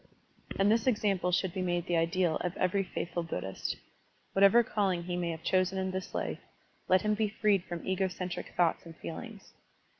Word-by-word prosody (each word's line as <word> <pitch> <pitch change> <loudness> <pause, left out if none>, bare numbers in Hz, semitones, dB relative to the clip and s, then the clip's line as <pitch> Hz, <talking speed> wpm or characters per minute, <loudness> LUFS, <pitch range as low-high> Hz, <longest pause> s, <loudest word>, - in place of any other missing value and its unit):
And 195 +2 +4
this 230 +2 +2
example 200 -6 +2
should 180 0 +1
be 190 - -2
made 175 -1 0
the 175 - 0
ideal 165 0 +2
of 180 0 -3
every 190 +2 +2
faithful 175 -2 -3
Buddhist. 95 - -4 0.6
Whatever 200 +5 +6
calling 195 -6 0
he 175 0 -3
may 175 -1 -1
have 160 -1 -5
chosen 185 +1 +2
in 190 0 -1
this 190 0 -5
life, - - -2 0.5
let 185 +2 +4
him 210 0 +2
be 210 0 +1
freed 205 -3 +2
from 175 -1 -6
ego 190 0 +1
centric 180 -1 -5
thoughts 170 -2 +2
and 165 -1 -12
feelings. 210 +4 -8
185 Hz, 185 wpm, -31 LUFS, 175-200 Hz, 0.6 s, Whatever